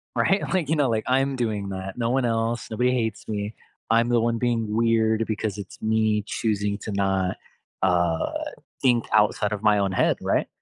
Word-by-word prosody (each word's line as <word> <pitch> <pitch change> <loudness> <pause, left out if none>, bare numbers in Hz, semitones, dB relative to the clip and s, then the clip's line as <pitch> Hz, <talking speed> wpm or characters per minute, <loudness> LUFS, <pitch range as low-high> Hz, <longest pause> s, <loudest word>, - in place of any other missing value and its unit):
Right? 195 +1 +2
Like, 165 -6 0
you 160 - +3
know, 140 -4 +2
like, 110 -1 0
"I'm 135 +1 +2
doing 105 -5 -2
that. 95 +2 -6
No 115 -1 0
one 130 0 +1
else, 115 0 -1
nobody 125 +3 +1
hates 115 -3 -2
me. 105 0 -3 0.4
I'm 115 +1 +3
the 120 -1 +3
one 115 0 +1
being 115 -3 0
weird 115 -1 +2
because 110 -1 -2
it's 100 -3 -9
me 110 -1 +1
choosing 105 -3 -1
to 105 - -6
not, 95 -1 0 0.5
uh, 85 -3 +1 0.5
think 120 -3 +3
outside 105 0 +3
of 105 - -4
my 105 -1 +4
own 100 -1 +1
head," - - +2
right? - - 0
110 Hz, 185 wpm, -24 LUFS, 100-120 Hz, 0.5 s, my